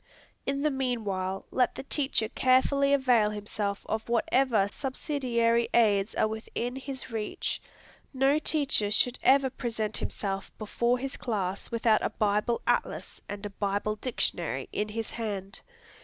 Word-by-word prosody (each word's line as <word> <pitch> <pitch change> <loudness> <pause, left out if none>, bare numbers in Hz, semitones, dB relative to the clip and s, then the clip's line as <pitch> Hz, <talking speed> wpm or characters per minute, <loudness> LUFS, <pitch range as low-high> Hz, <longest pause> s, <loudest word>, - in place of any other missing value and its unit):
In 275 +1 0
the 305 - +3
meanwhile, 210 -8 -2
let 255 - +2
the - - -6
teacher 270 -5 0
carefully 265 +3 +3
avail 250 -6 +4
himself 205 -1 -3
of 220 +1 -2
whatever 235 -2 +3
subsidiary 235 -2 0
aids 210 -3 +3
are - - +3
within 225 +3 -4
his 265 -1 -6
reach. 215 -2 -3 0.5
No 270 +2 +3
teacher 285 -9 +1
should 245 +4 +1
ever 270 0 +5
present 220 -4 -2
himself 195 -1 -3
before 235 +3 +1
his 270 +2 -5
class 200 -5 -2
without 225 -2 +3
a - - 0
Bible 210 +3 +1
Atlas - - -1
and 205 0 -5
a 205 - -4
Bible 205 +1 -1
Dictionary 175 - -1
in 210 +1 -1
his 225 +1 -4
hand. 205 -3 -4
230 Hz, 140 wpm, -29 LUFS, 210-260 Hz, 0.5 s, ever